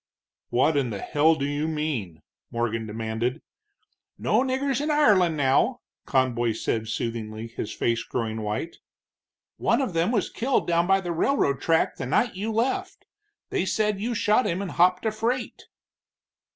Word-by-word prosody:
"What 145 +5 +2
in 135 -4 +1
the 105 - -4
hell 155 +6 +3
do 140 -3 -2
you 145 +2 -1
mean?" 150 - -3 0.3
Morgan 115 -1 -2
demanded. 115 +5 -3 0.7
"No - - +2
niggers 265 +1 0
in 300 - -1
Ireland, 200 - +4
now," 145 - +2 0.3
Conboy 120 -4 +1
said 110 0 -2
soothingly, 110 -1 -4
his 115 - -6
face 115 0 0
growing 110 -2 -3
white. 105 +10 -3 0.8
"One - - +2
of 255 -9 -1
them 165 +6 +1
was 215 -6 0
killed 260 +3 0
down 170 0 +2
by 195 0 +4
the 175 -2 -3
railroad 165 - +1
track 165 -1 +2
the - - -4
night 230 - +2
you 210 +4 -3
left. 365 - -1 0.5
They - - +1
said 210 0 0
you 235 +2 -1
shot 215 +4 +3
him 170 - -1
and 195 -2 -4
hopped 180 +3 +3
a 220 - +2
freight." 235 +3 -2
160 Hz, 160 wpm, -25 LUFS, -, 0.8 s, Ireland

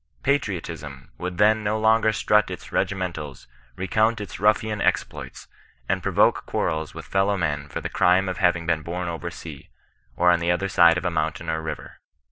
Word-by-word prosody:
Patriotism 80 - -3
would 90 0 -4
then 110 +2 +4
no 105 +1 0
longer 110 0 +4
strut 105 -1 +2
in 90 - -4
regimentals, 85 -8 -3 0.3
re 95 - -4
count 110 +2 +2
its 105 - -7
ruffian 105 +1 +2
exploits, - - -2 0.4
and - - 0
provoke - - +2
quarrels 80 -1 -2
with - - -8
fel 95 0 +1
low 100 -1 +1
men 75 -4 -2
for - - -5
the - - -3
crime 90 +2 +3
of 90 -1 -3
having 90 -2 +2
been 80 -1 0
bom 90 +3 -4
over 85 +1 -4
sea, 80 -5 -10 0.5
or 90 0 +4
on 85 - +3
the 85 +1 -1
other 90 +3 0
side 85 -3 +5
of 90 - -4
a 90 - +1
mountain 80 +1 -2
or 80 0 -2
river. 80 - -7
90 Hz, 190 wpm, -24 LUFS, 80-105 Hz, 0.5 s, side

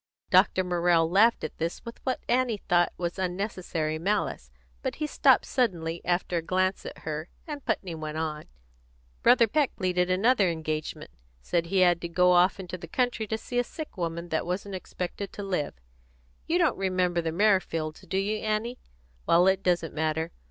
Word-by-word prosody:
Dr. 185 0 +5
Morrell 175 -2 +2
laughed 210 +7 +4
at - - -6
this 165 +7 -3
with 235 - -9
what 260 - -1
Annie 245 -2 +2
thought 175 -2 +3
was 175 +1 -3
unnecessary 180 -4 -2
malice; 190 - -1 0.3
but - - -3
he 305 - -2
stopped 300 - +4
suddenly, 170 - -1
after 175 0 0
a - - 0
glance 185 +3 0
at - - -8
her, 155 +1 -4 0.2
and 295 -3 -6
Putney 200 -6 -2
went 155 -1 -5
on 155 -1 -3 0.8
"Brother 240 -1 +6
Peck 290 +4 +1
pleaded 180 -2 0
another 200 +1 +3
engagement. 155 - -4 0.3
Said 170 -1 0
he 190 +1 +2
had 175 -1 +4
to 170 - -4
go 180 +1 +4
off 180 +2 +4
into 185 -1 -6
the 170 - -8
country 245 +2 -1
to 220 - -1
see 245 +2 -3
a - - +3
sick 310 +5 -8
woman 170 -1 -4
that 160 +1 -1
wasn't 195 +2 -3
expected 185 +1 -5
to 205 - -6
live. 180 -7 -2 0.7
You 335 - +2
don't 345 -7 +2
remember 185 -2 +1
the 165 -1 -2
Merrifields, 165 -5 +1
do 190 - -3
you, 205 +2 0
Annie? 215 +3 -2 0.5
Well, 175 +2 +5
it 190 0 +3
doesn't 175 -4 0
matter. 160 +1 -1
180 Hz, 180 wpm, -27 LUFS, 170-210 Hz, 0.8 s, Brother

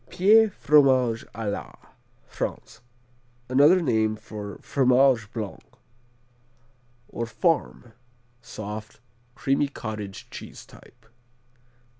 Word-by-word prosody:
Pie, 205 +5 +5
Fromage 130 - +3
à 110 -1 -4
la - - -7 0.5
France - - -6 0.7
Another 150 +8 +5
name 110 -5 +1
for 105 -2 -8
Fromage 130 -4 +3
Blanc 110 -4 -6 1.5
or 115 - -5
Farm; 145 - -1 0.5
soft, 110 -1 -8 0.4
creamy 135 +1 +1
cottage 105 -7 -7
cheese - - -10
type. - - -19
120 Hz, 85 wpm, -25 LUFS, 110-140 Hz, 1.5 s, Pie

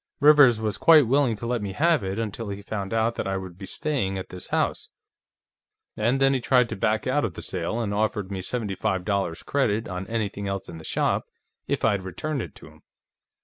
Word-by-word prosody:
Rivers 145 -6 +7
was 110 -3 -2
quite 155 -4 +7
willing 130 -1 +2
to 110 - -7
let 120 -1 -1
me 100 -2 -4
have 160 - +2
it 95 +1 -3
until 110 -1 -4
he 100 0 -6
found 100 -2 -4
out 115 +1 +1
that - - -4
I 95 0 -1
would 95 -2 -7
be 95 +1 -9
staying 130 -11 -1
at 95 - -6
this 90 - -6
house, - - -1 1.1
and 120 +5 +1
then 135 0 +4
he 130 - 0
tried 125 -1 +3
to - - -3
back 110 +2 0
out 135 +3 +1
of 100 -8 -2
the - - -7
sale 90 +5 -3
and 105 -3 -2
offered 105 -2 -1
me 95 -1 -3
seventy 105 +1 -3
five 95 -2 -1
dollars' 100 -5 -1
credit 115 -6 0
on 90 +1 -5
anything 100 -3 -3
else 100 -1 -3
in 80 - -8
the - - -11
shop, - - 0 0.4
if - - 0
I'd 100 -3 +2
return 130 - -3
it - - -8
to - - -13
him. - - -18
110 Hz, 225 wpm, -25 LUFS, 95-125 Hz, 1.1 s, Rivers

